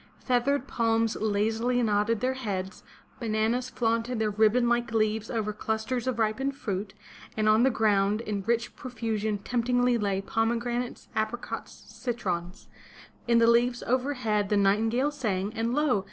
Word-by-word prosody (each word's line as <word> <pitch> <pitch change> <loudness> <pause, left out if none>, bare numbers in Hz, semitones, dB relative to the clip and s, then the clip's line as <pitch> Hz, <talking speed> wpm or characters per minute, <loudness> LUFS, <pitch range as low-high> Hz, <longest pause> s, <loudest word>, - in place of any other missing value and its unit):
Feathered 255 +2 0
palms 225 -2 +1
lazily 220 +4 0
nodded 210 0 +1
their 255 +1 +1
heads, 195 -7 -4 0.4
bananas 230 +2 0
flaunted 230 0 -1
their 220 -1 0
ribbon 220 +4 +3
like 240 -1 +1
leaves 220 0 0
over 215 -2 -2
clusters 220 +4 -2
of 255 -3 0
ripened 230 +5 0
fruit, 195 -5 -4 0.4
and 215 0 +1
on 215 +1 +5
the 265 - +5
ground 210 -3 +2
in 210 -3 -3
rich 235 0 0
profusion 220 -4 -2
temptingly 245 +2 +1
lay 200 -2 0
pomegranates, 235 +4 -2
apricots, 220 +2 -3
citrons. 185 -7 -4 0.6
In 235 0 +4
the 230 - +5
leaves 240 +1 +3
overhead 245 -5 0
the 210 - +2
nightingale 225 +8 +2
sang, 210 -7 -2
and 230 +2 -1
lo! 295 -8 +2
225 Hz, 140 wpm, -28 LUFS, 215-245 Hz, 0.6 s, on